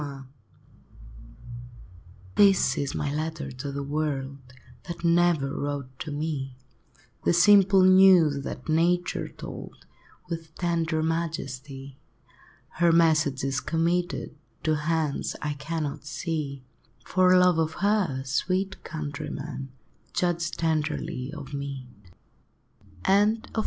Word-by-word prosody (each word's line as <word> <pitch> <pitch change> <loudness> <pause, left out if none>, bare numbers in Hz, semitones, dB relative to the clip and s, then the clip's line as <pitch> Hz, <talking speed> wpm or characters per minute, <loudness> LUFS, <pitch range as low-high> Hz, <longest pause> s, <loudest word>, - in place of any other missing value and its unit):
JT 140 -2 -7 2.1
This 195 -2 +4
is 140 -1 -2
my 145 -1 -2
letter 155 -2 -3
to 135 +3 -6
the 140 0 -4
world, 140 -2 -2 0.5
That 170 0 -7
never 170 -5 +3
wrote 140 -3 -4
to 155 - -5
me, 145 -3 -3 0.7
The - - +3
simple 195 +1 +6
news 185 -7 +6
that 125 - -7
Nature 175 +3 +1
told, - - -10 0.4
With 165 -2 -6
tender 165 -2 0
majesty. 140 -5 -4 0.8
Her 170 -1 +5
message 155 -5 +3
is 135 0 0
committed 170 +2 -1 0.3
To 155 - +2
hands 155 -1 -1
I 150 0 -2
cannot 145 0 -4
see; 150 -5 -4 0.4
For 185 0 +4
love 180 -2 +4
of 160 0 0
her, 195 -9 0
sweet 185 +8 -1
countrymen, 145 -3 -5 0.4
Judge 170 -2 0
tenderly 155 -4 -2
of 150 -3 -9
me! 140 -2 -5 1.2
I. 200 +1 +5
LIFE. 220 +2 +1
I. - - -1
155 Hz, 110 wpm, -26 LUFS, 140-170 Hz, 2.1 s, simple